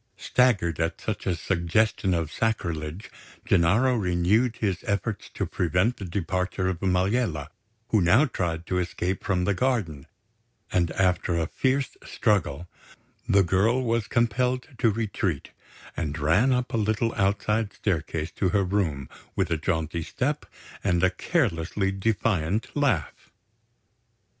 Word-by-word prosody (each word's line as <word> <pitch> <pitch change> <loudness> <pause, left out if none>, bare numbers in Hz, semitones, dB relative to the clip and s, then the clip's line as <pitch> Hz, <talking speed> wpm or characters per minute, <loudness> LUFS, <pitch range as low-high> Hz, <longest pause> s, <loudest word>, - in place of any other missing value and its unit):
Staggered 100 -11 +2
at 80 0 -1
such 110 -2 -4
a 90 - +2
suggestion 95 +3 +1
of 80 -2 -2
sacrilege, 85 -5 -2 0.3
Gennaro 100 +10 +3
renewed 105 +4 +2
his 95 -5 -1
efforts 100 +1 -2
to - - -1
prevent 90 +7 +1
the 100 - -6
departure 90 +1 -2
of 90 -3 -3
Maliella, 95 - 0 0.4
who 110 - +3
now 105 - +5
tried 85 - -3
to 90 +1 0
escape 90 +1 -2
from 90 -4 0
the 100 - +2
garden; 95 - -1 0.6
and 85 -2 +2
after 90 -2 +1
a 80 - +1
fierce 130 - -1
struggle, 90 -7 0 0.6
the 100 0 +5
girl 105 +9 +2
was 115 -2 0
compelled 125 +2 0
to 115 - +4
retreat, 100 -7 -2 0.4
and 75 -2 -3
ran 85 - +3
up 125 0 0
a - - +1
little 110 +2 0
outside 105 +2 0
staircase 80 -4 -2
to 95 - 0
her 100 +1 +2
room 90 -9 -1 0.3
with 95 -3 0
a 80 - +2
jaunty 80 +1 -1
step - - -2 0.4
and 85 -3 +1
a 95 - +4
carelessly 95 - 0
defiant 100 -1 0
laugh. 115 - 0
95 Hz, 135 wpm, -26 LUFS, 85-110 Hz, 0.6 s, now